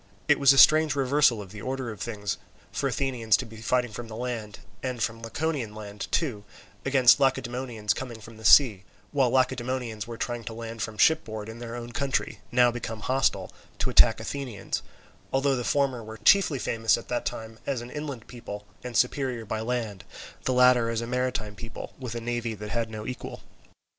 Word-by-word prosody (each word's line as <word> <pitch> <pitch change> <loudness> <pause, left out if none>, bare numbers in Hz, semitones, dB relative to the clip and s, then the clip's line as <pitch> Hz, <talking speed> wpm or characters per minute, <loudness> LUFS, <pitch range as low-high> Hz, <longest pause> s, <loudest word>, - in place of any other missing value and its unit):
It - - +4
was 140 -1 +7
a 135 - +3
strange 155 +1 +7
reversal 135 -4 +3
of 95 - -14
the 105 -1 -9
order 130 -2 -3
of 105 - -10
things 105 -4 -3 0.3
for 140 - -1
Athenians 125 -3 +1
to 130 - -4
be 110 -1 -12
fighting 125 0 +1
from 115 +3 -7
the 110 - -8
land, 115 -3 -5 0.2
and 125 -2 -3
from 115 0 -2
Laconian 120 -2 -2
land 105 -1 -7
too, 125 -11 -1 0.4
against 130 -3 +6
Lacedaemonians 125 -5 0
coming 120 -2 -6
from 110 +1 -12
the 110 - -13
sea; 105 -4 +6 0.3
while 135 -4 +3
Lacedaemonians 125 -3 0
were 115 -1 -6
trying 120 0 -3
to 115 - -5
land 115 0 -6
from 110 +1 -4
shipboard 110 -10 +2
in 110 +1 -8
their 120 -1 -6
own 120 0 -6
country, 135 +2 -1
now 125 0 +5
become 115 -2 -5
hostile, 130 +3 +1 0.3
to - - -1
attack - - +6
Athenians, 130 -8 -4 0.5
although 135 0 +2
the 125 - -2
former 135 -3 +1
were 110 +1 -9
chiefly 180 - +5
famous 115 -2 +1
at 115 - -9
the 120 - 0
time 110 0 -6
as 135 -4 -1
an 120 +1 -9
inland 145 -6 -5
people 105 -4 -8 0.2
and 125 -3 -3
superior 125 -2 +1
by 110 +1 -3
land, 110 -4 -3 0.4
the - - +2
latter 125 -2 +5
as 115 0 -1
a - - -3
maritime 125 -3 -2
people 115 +2 -8
with 125 -3 -5
a - - -2
navy 120 -1 -2
that 105 0 -7
had 115 -1 -1
no 110 -1 -7
equal. 125 +1 -6
120 Hz, 195 wpm, -27 LUFS, 110-130 Hz, 0.5 s, was